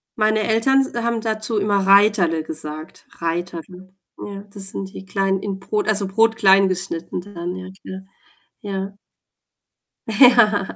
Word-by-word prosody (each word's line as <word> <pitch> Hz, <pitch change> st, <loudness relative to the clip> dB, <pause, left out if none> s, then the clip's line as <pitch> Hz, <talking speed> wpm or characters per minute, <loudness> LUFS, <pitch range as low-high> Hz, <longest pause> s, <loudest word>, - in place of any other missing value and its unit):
Meine 215 Hz, 0 st, +1 dB
Eltern 230 Hz, +5 st, +3 dB
s -, -, -8 dB
haben 235 Hz, -1 st, -1 dB
dazu 220 Hz, 0 st, -2 dB
immer 200 Hz, 0 st, +1 dB
„Reiterle“ 195 Hz, -5 st, +4 dB
gesagt, 155 Hz, 0 st, -7 dB
„Reiterle“, 175 Hz, +2 st, -5 dB, 0.2 s
ja. 200 Hz, -1 st, -8 dB
Das 195 Hz, -2 st, -3 dB
sind 195 Hz, -1 st, -6 dB
die 190 Hz, -, -9 dB
klein 195 Hz, 0 st, 0 dB
in 195 Hz, -1 st, -5 dB
Brot 210 Hz, +2 st, -2 dB
also, 205 Hz, -2 st, +1 dB
Brot 225 Hz, +3 st, +2 dB
klein 195 Hz, -2 st, +5 dB
geschnitten 175 Hz, -2 st, -4 dB
dann, 180 Hz, -2 st, -6 dB
ja, 185 Hz, 0 st, -8 dB
klar. 190 Hz, 0 st, -8 dB, 0.6 s
Ja. 195 Hz, -1 st, -5 dB, 1.1 s
Ja. 220 Hz, -3 st, +4 dB
195 Hz, 140 wpm, -20 LUFS, 185-215 Hz, 1.1 s, klein